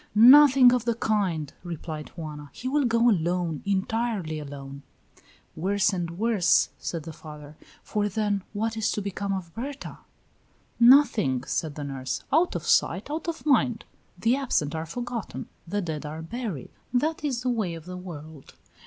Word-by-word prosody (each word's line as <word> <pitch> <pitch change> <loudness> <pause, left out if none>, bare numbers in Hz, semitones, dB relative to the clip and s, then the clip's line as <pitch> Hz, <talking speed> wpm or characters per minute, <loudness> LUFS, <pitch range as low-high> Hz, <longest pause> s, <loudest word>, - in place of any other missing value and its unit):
"Nothing 255 +2 +8
of 245 -2 0
the 235 -1 +1
kind," 190 - -1
replied 160 -3 -6
Juana. 150 -3 -7
"He 255 - -6
will 285 +1 +2
go 230 0 +3
alone 175 -5 +1
entirely 200 -4 -1
alone." 140 -1 -8 0.7
"Worse 200 +4 +1
and 170 -2 -3
worse," 205 -6 +3
said 165 -3 -4
the 160 - -8
father, 150 -1 -11 0.3
"for 210 -1 -1
then, 205 -1 0
what 220 +2 -2
is 220 -2 0
to 210 - -2
become 200 0 -3
of 185 -4 -4
Berta?" 275 +5 -6 0.8
"Nothing," 235 - +5
said 150 +2 -2
the 150 - -5
nurse. 135 -2 -4
"Out 335 +4 +3
of - - -3
sight, - - +2
out 320 +3 -4
of 335 -2 -4
mind. 250 -5 +2 0.3
The 230 +7 +2
absent 240 - 0
are 160 0 -4
forgotten; 240 +3 -5 0.2
the 205 +4 -1
dead 160 -4 -4
are 155 +2 -6
buried. 200 - -5 0.2
That 305 +6 0
is 255 -5 -1
the 255 - 0
way 210 -8 -1
of 165 -1 -10
the 180 0 -7
world. 160 -5 -10
200 Hz, 160 wpm, -26 LUFS, 160-235 Hz, 0.8 s, Nothing